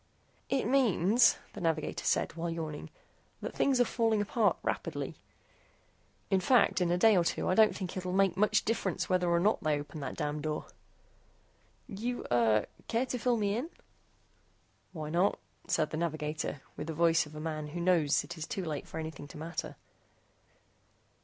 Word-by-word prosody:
"It 270 -4 +1
means," 230 -3 +4 0.2
the - - -8
navigator 160 -2 -1
said, - - +1
while 170 +1 -3
yawning, 160 -3 -5 0.5
"that - - -5
things 270 -2 +2
are 245 - +5
falling 225 -3 +1
apart 210 +1 +2
rapidly. - - -3 1.2
In 190 - +4
fact, 215 0 +3
in 175 - +2
a 175 - +2
day 220 +3 +6
or 175 - +4
two - - -1
I - - +3
don't 215 +2 +5
think 185 -3 -5
it'll 185 -1 -3
make 190 -1 +3
much 210 +2 +2
difference 205 -4 -1
whether 180 -1 +2
or 170 0 +3
not 210 +5 +2
they 150 -1 +1
open 145 +1 -8
that 135 -2 -5
damn 150 -1 -2
door." 155 0 -3 1.2
"You, 235 +4 -4
er, 110 -3 +3 0.2
care 235 +3 +1
to 250 -1 -3
fill 240 +1 +2
me 205 -1 0
in?" 260 +8 -3 1.2
"Why 155 -4 -6
not?" 180 +5 +2 0.3
said 155 -1 +1
the 155 - -3
navigator, 155 -3 -3
with 150 - -6
the 165 - -3
voice 165 -1 +3
of 150 - -13
a - - -6
man 155 -1 -4
who 165 +4 -6
knows 170 -4 +3
that - - -12
it 170 - -6
is 160 - -4
too 190 -4 -3
late 150 -3 -4
for 160 - -6
anything 155 -2 -6
to 145 - -11
matter. 165 +3 -5
175 Hz, 180 wpm, -31 LUFS, 155-210 Hz, 1.2 s, day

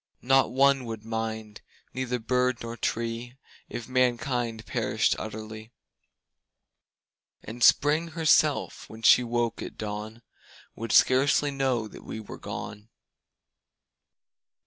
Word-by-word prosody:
Not 135 0 +4
one 135 0 +3
would 110 -2 -7
mind, 110 -1 -4 0.3
neither 125 -1 -2
bird 125 +1 0
nor 115 0 -5
tree 115 +2 -3 0.3
If 120 - -6
mankind 120 -2 0
perished - - 0
utterly; 110 0 -7 1.7
And 120 +2 -5
Spring 155 +3 +4
herself, 155 -2 +1
when 110 +1 -12
she 125 - +7
woke 120 -1 -1
at - - -8
dawn, 110 +2 -6 0.5
Would 115 0 -5
scarcely 140 +2 +4
know 130 -5 0
that - - -13
we - - -7
were 110 - -10
gone. 105 +1 -7
120 Hz, 110 wpm, -27 LUFS, 110-130 Hz, 1.7 s, she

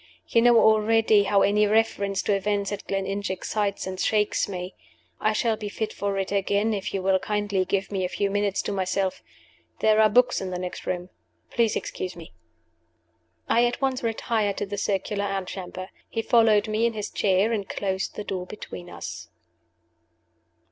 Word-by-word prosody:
"You 230 - +3
know 240 -1 +6
already 220 -1 +4
how 200 0 +3
any 210 +1 +3
reference 200 -2 +1
to 205 - +1
events 200 0 0
at 205 0 -6
Gleninch 195 +1 -2
excites 200 +2 -2
and 185 0 -5
shakes 210 0 +1
me. 180 -1 -5 0.5
I 215 - +2
shall 225 +1 +1
be 210 -1 -5
fit 220 +1 -3
for 200 -1 -2
it 195 0 -2
again, 200 +2 +1
if 195 -2 -3
you 195 -1 -3
will 190 0 +3
kindly 205 -2 -1
give 195 +1 -1
me 190 -2 -1
a 180 - -1
few 200 +1 -1
minutes 205 -1 0
to - - -3
myself. 190 0 -1 0.6
There 215 0 +4
are 215 - +6
books 245 +3 +3
in 190 - -3
the 180 - -3
next 180 0 -6
room. 180 0 -3 0.4
Please 230 -3 +2
excuse 180 -1 -4
me." 165 - -12 1.1
I 235 - +4
at 240 - -3
once 265 -2 0
retired 220 -3 -1
to - - -1
the 200 +1 -5
circular 200 +1 -1
antechamber. 190 -1 -5 0.2
He 225 - -2
followed 220 -4 +4
me 215 +2 +2
in 230 - -3
his 210 -2 -5
chair, 195 +3 +2
and 205 -4 -2
closed 190 -1 -2
the 210 - -4
door 185 -3 -4
between 180 -4 -9
us. - - -7
205 Hz, 180 wpm, -25 LUFS, 190-215 Hz, 1.1 s, know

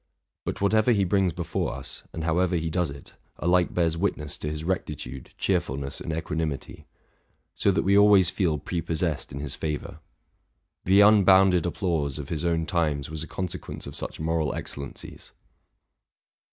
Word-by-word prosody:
But - - -4
whatever 110 +4 +4
he 100 -3 +2
brings 95 -1 +2
before 85 0 -3
us, - - -6
and 80 - -5
however 90 +2 +1
he 80 -1 -1
does 90 -1 0
it, 70 -1 -8 0.2
alike 90 +1 +2
bears 85 -2 +1
witness 80 -5 -2
to 75 - -3
his 75 0 -4
rectitude, 75 -7 -4
cheerfulness, 70 +1 -1
and - - -4
equanimity; 80 -2 -4 0.7
so - - +1
that 95 - +2
we 100 +1 +3
always 100 -3 +6
feel 85 -6 +1
pre 85 +4 -3
possessed 80 -1 -2
in 70 - -6
his 70 -1 -3
favor. 75 -1 -4 0.9
The 95 +3 +6
unbounded 95 -4 +6
applause 80 -7 -1
of 70 -2 -6
his 80 -2 -2
own 85 -1 +1
times 75 -6 -1
was 80 -1 -3
a 80 - -5
consequence 90 -2 -5
of - - -7
such - - -5
moral 80 0 0
excellencies. 70 -1 -7
85 Hz, 160 wpm, -26 LUFS, 75-95 Hz, 0.9 s, always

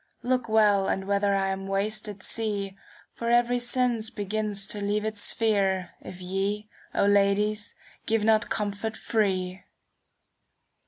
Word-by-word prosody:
Look 250 -1 0
well, 210 -3 +4
and 190 - -1
whether 200 0 +2
I 195 0 +1
am 195 0 -3
wasted 205 0 -2
see. 205 -4 -2 0.4
For 235 - -3
every 240 +1 +3
sense 245 -2 0
begins 205 -1 -1
to 205 +1 -3
leave 205 +1 0
its 215 -1 -3
sphere. 195 -5 +1
If 180 - -9
ye, 195 +3 -2 0.3
O - - +3
ladies, 205 +1 +2 0.3
give 225 -1 +2
not 220 +1 +3
comfort 215 0 -2
free. 190 -4 0
210 Hz, 130 wpm, -27 LUFS, 195-220 Hz, 0.4 s, well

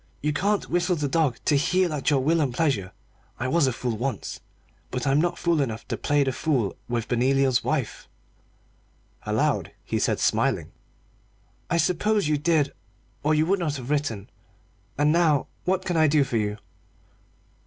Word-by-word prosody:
You 150 0 +1
can't 200 +7 0
whistle 175 +1 +1
the 150 -3 -1
dog 140 -4 +1
to 150 - +3
heel 180 +4 +2
at 145 -1 0
your 140 -3 +2
will 165 +3 +2
and 140 -4 0
pleasure. 120 - 0 0.5
I 125 - -1
was 160 +1 +3
a - - +2
fool 120 -1 -3
once, 120 -1 -4 0.5
but 125 -1 -3
I'm 140 +2 +3
not 175 0 0
fool 170 -3 +1
enough 115 -4 -4
to - - -1
play 145 -1 +1
the 135 - 0
fool 130 -7 -1
with 115 -2 -2
Benoliel's 130 +1 +2
wife." 140 -7 -2 1.2
Aloud - - 0
he - - -1
said, - - +1
smiling - - +1 1.0
"I 170 - +1
suppose 200 +3 +1
you 150 -1 +1
did, 150 -2 +1 0.5
or 155 +1 +2
you 155 +1 +3
would 195 +3 +1
not 155 -4 -1
have 130 0 -6
written. 140 -9 -1 0.7
And 145 +1 +3
now 160 -4 +3 0.2
what 185 +1 0
can 175 -2 -1
I 155 -1 +5
do 145 -1 +4
for 130 -3 -2
you?" 105 -1 -1
145 Hz, 175 wpm, -25 LUFS, 130-165 Hz, 1.2 s, I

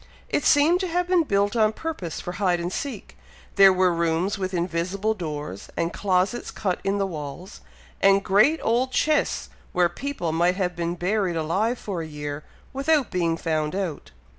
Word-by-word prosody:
It - - 0
seemed 310 +5 +4
to 375 - -1
have 355 +1 0
been 360 -1 +4
built 205 -6 +1
on 215 -1 +3
purpose 260 - -5
for 180 - -5
hide 180 -2 +1
and 175 +1 -3
seek; 265 -8 -5 0.4
there 195 -1 +8
were 185 -1 +3
rooms 170 +3 0
with 190 -2 -3
invisible 180 +4 -1
doors, 150 - -6
and 170 0 -1
closets 195 +4 0
cut 185 -4 -2
in 195 +1 0
the 200 - +1
walls, 160 0 -7 0.4
and 195 0 +5
great 215 +12 +4
old 245 +3 +1
chests 305 +4 +1 0.2
where 175 -1 +3
people 210 - -4
might 175 +3 +2
have 180 -2 -1
been 170 0 -2
buried 185 0 0
alive 190 +10 0
for 190 -7 -4
a 160 - -6
year, 150 -1 -6 0.3
without 275 -1 +1
being 170 -2 0
found 155 0 -1
out. 185 -7 -4
185 Hz, 175 wpm, -24 LUFS, 170-220 Hz, 0.4 s, there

